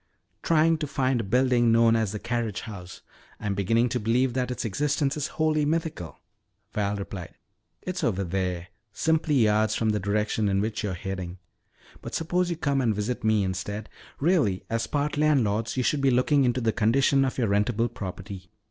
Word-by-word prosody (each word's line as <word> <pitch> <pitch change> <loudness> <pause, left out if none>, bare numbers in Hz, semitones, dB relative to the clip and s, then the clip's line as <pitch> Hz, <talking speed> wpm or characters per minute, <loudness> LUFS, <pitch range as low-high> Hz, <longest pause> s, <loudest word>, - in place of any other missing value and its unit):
"Trying 165 0 +3
to 150 - -2
find 130 -3 0
a - - -5
building 120 +2 +3
known 115 0 +5
as 110 -3 0
the 105 - -4
carriage 115 -3 -2
house. 95 -5 -9 0.4
I'm 105 -2 -2
beginning 115 +5 +2
to 125 - -1
believe 120 +3 +1
that 125 0 -1
its 125 - -3
existence 140 +6 0
is 150 -1 -2
wholly 155 -1 +2
mythical," 155 - -2 0.6
Val 105 -1 0
replied. 100 -3 -7 0.5
"It's 185 0 -4
over 100 -3 0
there, 90 -1 -2 0.2
simply 160 +5 +1
yards 110 -3 +3
from 110 - +1
the 105 - 0
direction 105 +1 0
in 95 0 +1
which 110 +1 -2
you're 100 -4 -2
heading. 90 -1 -5 0.6
But - - -6
suppose 175 +2 0
you 170 - -1
come 140 -4 0
and 115 -4 +1
visit 105 +4 -3
me 110 -2 +3
instead. 95 +3 -4 0.3
Really, 140 - +2
as 115 0 -1
part 145 0 -1
landlords, 120 -7 +1
you 130 - +1
should 145 +3 +1
be 135 - +4
looking 130 +3 +3
into 125 +1 +1
the 110 -2 +1
condition 135 +4 +3
of 130 - -2
your 115 -5 +1
rentable 105 +3 +1
property." 95 -2 -7
115 Hz, 185 wpm, -26 LUFS, 100-135 Hz, 0.6 s, known